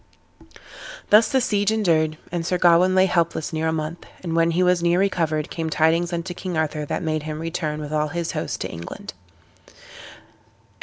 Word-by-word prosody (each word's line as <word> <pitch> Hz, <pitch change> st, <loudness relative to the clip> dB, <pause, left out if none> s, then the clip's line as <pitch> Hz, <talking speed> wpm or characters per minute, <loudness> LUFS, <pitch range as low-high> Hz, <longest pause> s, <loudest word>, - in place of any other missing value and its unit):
Thus 215 Hz, +2 st, +6 dB
the 265 Hz, -, +3 dB
siege 205 Hz, -4 st, +1 dB
endured, 160 Hz, -8 st, +1 dB
and 170 Hz, -1 st, -2 dB
Sir 180 Hz, +2 st, 0 dB
Gawain 175 Hz, +1 st, +4 dB
lay 190 Hz, 0 st, +5 dB
helpless 170 Hz, -3 st, 0 dB
near 160 Hz, 0 st, -1 dB
a -, -, +1 dB
month; 160 Hz, +1 st, -4 dB, 0.2 s
and 165 Hz, -2 st, -3 dB
when 165 Hz, 0 st, +3 dB
he 170 Hz, +2 st, +1 dB
was 180 Hz, -1 st, +3 dB
near 170 Hz, +1 st, +2 dB
recovered 165 Hz, -6 st, 0 dB
came 165 Hz, -1 st, -3 dB
tidings 165 Hz, +3 st, +2 dB
unto 170 Hz, +1 st, -3 dB
King 180 Hz, -1 st, -5 dB
Arthur 155 Hz, -1 st, -1 dB
that -, -, -3 dB
made 155 Hz, -1 st, -1 dB
him 155 Hz, 0 st, -5 dB
return 160 Hz, -2 st, -3 dB
with 150 Hz, 0 st, -6 dB
all 155 Hz, 0 st, +1 dB
his 170 Hz, +2 st, -3 dB
host -, -, -4 dB
to -, -, -4 dB
England. 85 Hz, +2 st, -8 dB
165 Hz, 185 wpm, -23 LUFS, 155-180 Hz, 0.2 s, Thus